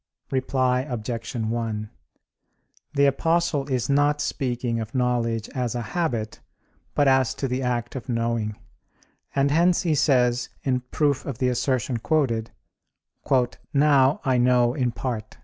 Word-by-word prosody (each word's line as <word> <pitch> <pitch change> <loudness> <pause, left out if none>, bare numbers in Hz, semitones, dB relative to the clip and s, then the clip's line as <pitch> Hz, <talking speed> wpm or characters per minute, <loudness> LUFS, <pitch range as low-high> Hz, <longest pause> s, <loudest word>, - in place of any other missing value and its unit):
Reply 130 -1 +1
Obj. 115 +1 -4
1: 110 -2 -2 1.1
The 140 0 +4
Apostle 160 0 +1
is 130 -3 0
not 145 +1 +2
speaking 120 -5 -2
of 110 +2 -6
knowledge 120 -3 0
as 125 -3 -2
a 120 - -2
habit, 115 -11 -2 0.6
but 145 - +3
as 130 -2 +3
to 135 - -2
the 125 +1 -2
act 120 -1 -2
of 130 0 -7
knowing; 115 -2 -1 0.8
and 140 0 +2
hence 175 +4 +3
he 165 -3 +2
says, 125 -4 +2
in 130 -2 +1
proof 145 -3 +1
of 135 -5 -5
the 125 0 +1
assertion 125 -1 0
quoted, 115 -4 0 1.3
"Now, 140 -1 +4
I 130 -2 +2
know 125 -1 +3
in 125 -3 0
part." 115 -3 -5
125 Hz, 135 wpm, -24 LUFS, 115-140 Hz, 1.3 s, The